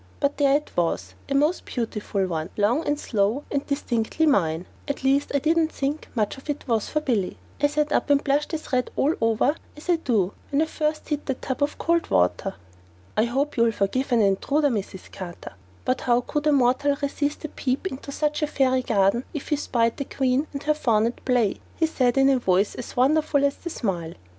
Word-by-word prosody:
But 280 0 0
there 280 -1 +4
it 300 - -9
was, 170 -1 -1 0.2
a 275 - 0
most 300 +6 +2
beautiful 210 -4 -2
one, 165 -3 -3
long 230 +9 +2
and 290 0 +1
slow 220 +4 0
and 280 -1 0
distinctly 275 +1 0
mine 175 - +2 0.2
at 280 -2 -3
least 275 +2 +2
I 285 - +2
didn't 320 +2 +2
think 285 +3 -3
much 215 +2 -1
of 275 - -16
it 290 -1 -3
was 225 -4 0
for 305 - 0
Billy. 220 -10 -1 0.2
I 290 - +5
sat 300 +1 0
up - - +1
and 285 0 +4
blushed 285 +2 +1
as 310 -3 -8
red 250 -1 +1
all 295 +4 +2
over 225 +6 +2 0.2
as 300 - -11
I 345 - +4
do 215 - 0 0.2
when 285 +2 +2
I - - +1
first 305 -1 -2
hit 295 -1 -2
that 270 -2 -3
tub 260 +1 -3
of 285 +1 0
cold 335 0 +1
water. 195 - +1 0.6
"I 215 - +3
hope 275 +5 -1
you'll 230 -1 +4
forgive 255 +7 -1
an 235 -3 +4
intruder, 280 +10 +2
Mrs. 200 -5 -5
Carter, 175 -2 -8 0.3
but 255 - 0
how 240 0 +3
could 295 +4 -2
a - - +5
mortal 280 +1 +3
resist 285 +1 -2
a - - -4
peep 265 +5 -2
into 280 -5 -5
such 300 +1 -1
a 300 - +2
fairy 260 -3 +2
garden 200 +1 +2
if 295 - -5
he 300 - +3
spied 235 -5 0
the 280 - -3
queen 265 +3 0
and 280 0 -6
her 305 - +3
faun 230 -7 +2
at 235 - -3
play?" 245 -6 +2 0.2
he 325 - +2
said 255 -5 +1
in 270 0 +5
a 265 -2 +3
voice 190 -2 +2
as 245 - -8
wonderful 285 +2 +3
as 280 - 0
the 340 - -6
smile. 175 - -3
270 Hz, 215 wpm, -24 LUFS, 225-295 Hz, 0.6 s, I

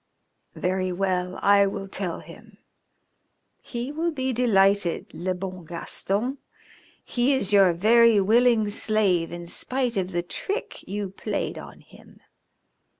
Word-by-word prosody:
"Very 185 0 -1
well, 180 0 -1
I 200 0 +5
will 195 0 -5
tell 190 -3 -4
him. 195 +6 -15 1.0
He 240 +2 -5
will 325 +3 -1
be 260 -5 -2
delighted, 200 -6 +2
le 185 +1 -2
bon 185 -1 -6
Gaston. 200 - -3 0.7
He 255 +3 +1
is 210 -6 -1
your 195 -3 +6
very 225 +4 +5
willing 225 +2 +3
slave 205 -5 +1
in 175 0 -7
spite 250 +6 -2
of 185 -1 -1
the 175 -1 -1
trick 395 - -5
you 200 -1 -4
played - - -4
him. - - -14
200 Hz, 125 wpm, -25 LUFS, 185-235 Hz, 1.0 s, your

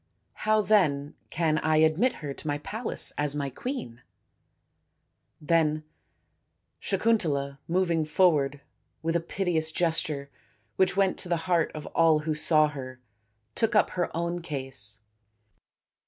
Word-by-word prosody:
How 215 0 +5
then 155 -9 +2 0.2
can 155 -2 +1
I 155 0 +2
admit 160 +11 +3
her 140 - -3
to 155 - -9
my 145 0 0
palace 220 +10 0
as 145 -1 +1
my 140 -2 -2
queen? 125 - -6 0.7
" - - -49
Then 155 -2 +2 1.0
Sakuntala, 160 -10 0
moving 170 -2 +1
forward 150 -4 +2 0.4
with 165 +1 0
a - - +3
piteous 165 -2 -1
gesture 155 -5 -1 0.4
which 190 0 +2
went 195 -2 +2
to 180 - -4
the 170 -2 -1
heart 175 -3 +2
of 155 - -6
all 165 -2 +5
who 155 0 -1
saw 155 0 +4
her, 130 -3 -8 0.5
took 225 0 0
up 210 - +4
her 175 -1 -1
own 170 +1 -2
case. 130 -9 -4
160 Hz, 135 wpm, -27 LUFS, 145-180 Hz, 1.0 s, How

